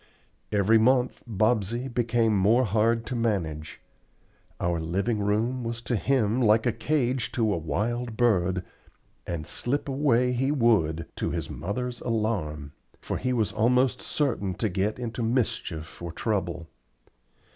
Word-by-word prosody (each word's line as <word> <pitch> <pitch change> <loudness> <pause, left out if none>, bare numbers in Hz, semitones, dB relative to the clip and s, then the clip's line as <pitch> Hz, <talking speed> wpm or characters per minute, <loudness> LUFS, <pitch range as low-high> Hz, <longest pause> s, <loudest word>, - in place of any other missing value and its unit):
Every 105 +2 +4
month 125 +2 +2
Bobsey 110 +3 +1
became 115 -3 +1
more 110 +6 +4
hard 115 +2 +1
to 125 - -4
manage. 85 -10 -2 0.8
Our 85 -1 0
living 95 +7 -1
room 110 +5 0
was 115 0 -3
to 120 - -1
him 120 -1 +1
like 110 0 +4
a 120 - +3
cage 125 0 0
to 110 -3 +1
a - - -1
wild 110 +9 -2
bird, 95 -6 +2 0.6
and 85 -3 -3
slip 140 - -2
away 130 -3 +2
he 135 +3 +1
would, 100 - +2
to - - -1
his - - -4
mother's 120 +6 -4
alarm; 95 - -2 0.3
for - - -3
he 130 - -1
was 115 -4 +1
almost 125 +4 +2
certain 115 -10 -1
to 110 +4 -1
get 100 +3 -1
into 120 -1 -4
mischief 95 -10 -2
or 85 -1 -5
trouble. 90 -4 -2
115 Hz, 140 wpm, -27 LUFS, 95-120 Hz, 0.8 s, Every